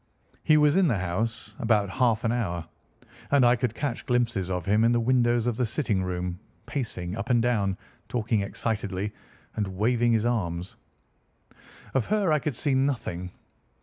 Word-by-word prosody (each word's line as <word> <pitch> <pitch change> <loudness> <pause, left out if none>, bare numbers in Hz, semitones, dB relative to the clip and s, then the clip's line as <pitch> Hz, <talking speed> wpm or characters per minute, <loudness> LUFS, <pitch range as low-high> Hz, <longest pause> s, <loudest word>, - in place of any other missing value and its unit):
"He 155 - +5
was 150 -1 +4
in 190 -2 +4
the 120 -8 +1
house 105 +4 -3
about 110 -3 +2
half 120 -3 +2
an 115 - +1
hour, 85 -9 -2 0.6
and 140 -3 +5
I 120 +1 +5
could 120 -2 -2
catch 140 -4 -3
glimpses 115 -7 +1
of 90 -2 -2
him 105 +3 +3
in 115 - +4
the 120 - +3
windows 120 -1 +2
of 120 -2 0
the 125 - +1
sitting 110 -6 0
room, 90 -1 -3 0.3
pacing 105 -10 -4
up 110 +1 -5
and 120 -1 +4
down, 105 -5 +1 0.3
talking 115 -3 0
excitedly, 100 -1 -3 0.4
and 105 -2 -1
waving 120 +2 +2
his 110 0 +2
arms. 90 -7 -2 1.2
Of 135 -4 +1
her 205 -5 +2
I 150 - +3
could 145 -3 -3
see 140 +3 0
nothing. 120 -10 -1
115 Hz, 170 wpm, -27 LUFS, 100-125 Hz, 1.2 s, He